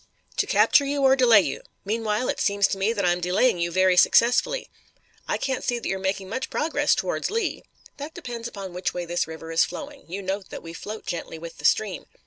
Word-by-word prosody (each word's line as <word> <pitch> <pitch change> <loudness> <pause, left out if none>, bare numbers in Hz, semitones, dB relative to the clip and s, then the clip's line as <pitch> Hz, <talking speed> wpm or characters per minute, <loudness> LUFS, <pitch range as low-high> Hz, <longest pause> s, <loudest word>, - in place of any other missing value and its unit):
"To - - +1
capture 285 - +5
you, 280 0 -1
or 265 0 +6
delay 235 -5 +6
you. 150 -7 -4 0.2
Meanwhile, 220 +2 -1
it - - -2
seems 200 -1 +2
to 195 - -3
me 200 +4 +2
that 205 -5 -1
I'm 175 0 +2
delaying 180 +4 +2
you 170 0 -1
very 185 +1 +4
successfully. 255 - +4 0.6
I - - 0
can't 265 -2 -2
see 245 - 0
that 235 - -5
you're 190 - -1
making 190 0 -2
much 260 +6 -4
progress 315 +1 +1
towards - - -2
Lee." 455 +2 -1 0.4
"That 290 +2 -7
depends 240 -8 -6
upon 195 -5 -8
which 180 +1 -3
way 175 -1 -3
this 175 -1 -1
river 160 0 -8
is 165 - +4
flowing. 285 -1 -7
You 195 +4 -5
note 190 +1 -3
that - - -8
we 165 0 -8
float 215 +5 -7
gently 165 -1 -5
with 165 +1 -10
the - - -7
stream." 205 -5 +1
200 Hz, 220 wpm, -25 LUFS, 180-255 Hz, 0.6 s, or